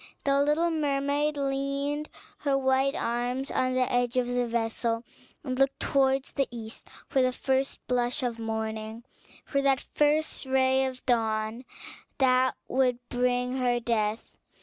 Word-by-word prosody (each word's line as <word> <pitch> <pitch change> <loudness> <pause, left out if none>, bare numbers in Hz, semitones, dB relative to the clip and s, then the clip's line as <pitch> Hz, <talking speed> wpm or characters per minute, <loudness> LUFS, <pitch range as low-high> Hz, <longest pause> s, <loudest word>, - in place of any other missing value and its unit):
The 275 0 +3
little 305 +4 +2
mermaid 290 -1 0
leaned 280 +2 -1 0.3
her 280 -2 +1
white 265 +1 +2
arms 245 +4 -2
on 255 0 +1
the 255 - +2
edge 245 0 +1
of 250 - +3
the 245 0 0
vessel, 230 0 -1 0.4
and 255 -3 -3
looked 270 0 +2
towards 270 -1 +1
the 275 -2 0
east 225 -2 -8 0.2
for 270 - +2
the 255 0 +3
first 265 +1 -1
blush 245 +2 0
of 235 -2 -2
morning, 220 0 -4 0.4
for 275 - 0
that 275 -1 +2
first 300 -1 +1
ray 265 0 +3
of 255 -1 -6
dawn 225 0 0 0.5
that 260 -1 +3
would 255 -2 +2
bring 250 +1 0
her 245 -2 +1
death. 225 -2 -1
255 Hz, 145 wpm, -28 LUFS, 240-275 Hz, 0.5 s, The